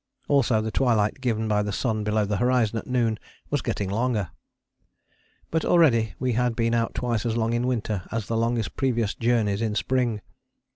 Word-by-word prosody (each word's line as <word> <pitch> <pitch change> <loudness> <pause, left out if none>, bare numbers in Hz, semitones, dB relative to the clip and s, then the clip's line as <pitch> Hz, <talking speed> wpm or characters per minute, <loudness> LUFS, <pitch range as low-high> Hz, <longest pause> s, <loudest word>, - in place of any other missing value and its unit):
Also 125 -6 +3
the 110 0 -3
twilight 115 -1 +1
given 110 -3 0
by 105 -1 +2
the 105 0 -2
sun 110 0 -1
below 105 0 +1
the 100 0 -1
horizon 120 -2 +2
at - - -11
noon 115 -3 0 0.3
was 145 -2 +1
getting 100 - -2
longer. 105 -2 -1 1.2
But 160 0 0
already 115 - +3
we 125 -1 -1
had 120 0 +1
been 115 0 +1
out 115 -1 0
twice 120 -3 -1
as 115 -1 -1
long 115 0 0
in 120 +1 0
winter 110 -6 -2
as 115 -2 -2
the 115 - -2
longest 115 -1 -1
previous 120 -6 0
journeys 115 -4 +1
in 110 -2 -1
spring. 120 -2 0
115 Hz, 185 wpm, -25 LUFS, 110-125 Hz, 1.2 s, Also